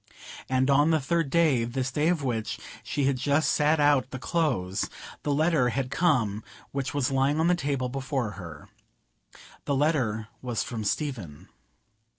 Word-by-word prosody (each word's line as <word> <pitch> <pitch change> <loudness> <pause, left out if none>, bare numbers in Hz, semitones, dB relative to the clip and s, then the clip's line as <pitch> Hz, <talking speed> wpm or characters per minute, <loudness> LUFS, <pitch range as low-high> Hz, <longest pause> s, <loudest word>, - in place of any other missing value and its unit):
And 130 0 +2
on 145 +3 +4
the 160 -1 +3
third 165 +2 0
day—this 130 -5 +1
day 150 +4 +1
of 170 -4 +1
which 115 -4 -2 0.2
she 145 - -2
had 135 -1 +2
just 145 +4 +2
sat 150 +1 +3
out 145 -3 +3
the 130 - -5
close—the 130 - -2
letter 150 -3 +3
had 130 +1 -2
come 115 - +1 0.3
which 140 -1 -2
was 140 -1 +1
lying 135 +3 +2
on 160 - +3
the 175 - +4
table 140 -6 -1
before 135 -3 -2
her. 85 -7 -10 1.0
The 140 - 0
letter 130 -8 +1
was 120 -3 -2
from 115 -3 -5
Stephen. 105 - -3
135 Hz, 155 wpm, -27 LUFS, 120-150 Hz, 1.0 s, on